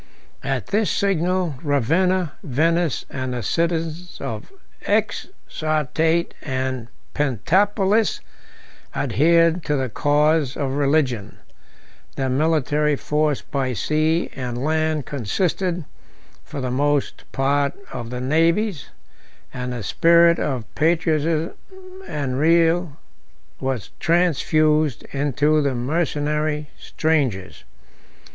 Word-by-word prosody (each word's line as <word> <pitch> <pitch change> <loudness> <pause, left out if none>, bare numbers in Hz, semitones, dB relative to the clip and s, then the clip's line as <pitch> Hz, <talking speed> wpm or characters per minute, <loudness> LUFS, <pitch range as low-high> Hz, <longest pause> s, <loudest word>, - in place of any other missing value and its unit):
37 135 0 -1
At - - -9
this 210 +1 +2
signal, 180 -4 0
Ravenna, 165 +5 +1
Venice, 165 +1 0
and 130 -1 -3
the 120 - -3
cities 165 - -2
of - - -5
the 390 -1 -24
Exarchate 165 - 0
and 130 -3 -3 0.3
Pentapolis, 195 - +2 0.8
adhered 165 +3 +3
to 150 - +1
the 130 -2 -1
cause 150 +2 +2
of 135 -2 -1
religion; 135 -7 0 0.8
their 135 -1 -1
military 150 +1 +1
force 150 0 0
by 135 -3 -2
sea 155 - 0
and 125 -1 -4
land 155 -1 0
consisted, 170 - -1 0.6
for - - -7
the 125 -1 -2
most 145 +2 -1
part, 140 +1 +1 0.2
of 120 -2 -5
the 125 0 -4
natives; 165 - +1 0.6
and 125 0 -4
the 120 -3 -4
spirit 170 - +5
of 130 -6 -2
patriotism 160 0 +1 0.5
and 135 -3 -2
zeal 165 -1 +3 0.6
was 130 -5 -3
transfused 155 -4 +2
into 145 +2 +2
the 140 -3 0
mercenary 150 +2 -1
strangers. 135 - -1
150 Hz, 100 wpm, -22 LUFS, 135-165 Hz, 0.8 s, spirit